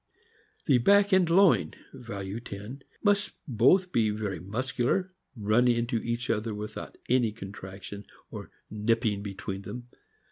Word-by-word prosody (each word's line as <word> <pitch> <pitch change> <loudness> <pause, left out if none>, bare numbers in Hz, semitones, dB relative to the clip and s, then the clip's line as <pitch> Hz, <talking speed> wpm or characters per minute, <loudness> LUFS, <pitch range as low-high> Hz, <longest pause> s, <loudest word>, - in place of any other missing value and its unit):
The 135 -5 +4
back 200 - +4
and 185 -3 +4
loin 185 +1 +4 0.2
(value 105 -5 -6
10) 115 +4 -8 0.2
must 205 -1 +2
both 150 - +4
be 115 -8 +2
very 105 -2 -3
muscu 120 +6 -3
lar, 185 +7 0 0.2
running 120 +3 +3
into 120 +1 0
each 120 +2 -3
other 110 -1 -2
without 105 +1 -7
any 120 -3 +3
contraction 100 -1 -9 0.2
or - - -8 0.2
"nipping" 105 -1 0
between 100 -1 -5
them. 120 +5 -8
115 Hz, 135 wpm, -28 LUFS, 105-130 Hz, 0.2 s, The